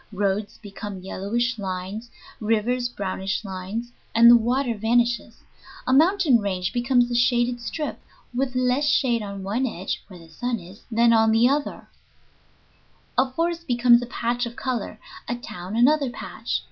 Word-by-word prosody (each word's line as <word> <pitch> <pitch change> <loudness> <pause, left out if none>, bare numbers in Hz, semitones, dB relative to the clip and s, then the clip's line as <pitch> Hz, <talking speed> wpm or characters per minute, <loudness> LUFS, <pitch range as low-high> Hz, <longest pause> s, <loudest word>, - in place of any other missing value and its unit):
Roads 200 +1 -1
become 205 -2 -8
yellowish 230 +6 -2
lines; 195 +4 -5 0.3
rivers 230 +3 0
brownish 195 -1 -3
lines 195 +5 -5 0.2
(and 235 +1 +8
the - - +9
water 240 +2 +1
vanishes); 230 +1 0 0.4
a 255 - +1
mountain 320 - +4
range 185 -3 -2
becomes 245 0 +2
a - - -1
shaded 240 0 +2
strip, 295 +7 -4 0.3
with 255 +1 -1
less 255 +3 +2
shade 240 -5 +2
on 200 -2 -6
one 225 +7 0
edge 190 -5 -4
(where 185 - -12
the 165 - -14
sun 240 +9 -3
is) 185 +5 -13
than 230 +1 +4
on 225 0 +4
the 225 +2 +5
other; 285 +2 -1 1.3
a 260 +1 +3
forest 335 +3 -2
becomes 240 -1 +5
a 245 - -5
patch 240 0 -1
of 235 - -9
color; 240 -5 -3 0.3
a 240 - -1
town 185 -4 -7
another 280 +3 +4
patch. 240 - -4
235 Hz, 155 wpm, -24 LUFS, 205-250 Hz, 1.3 s, the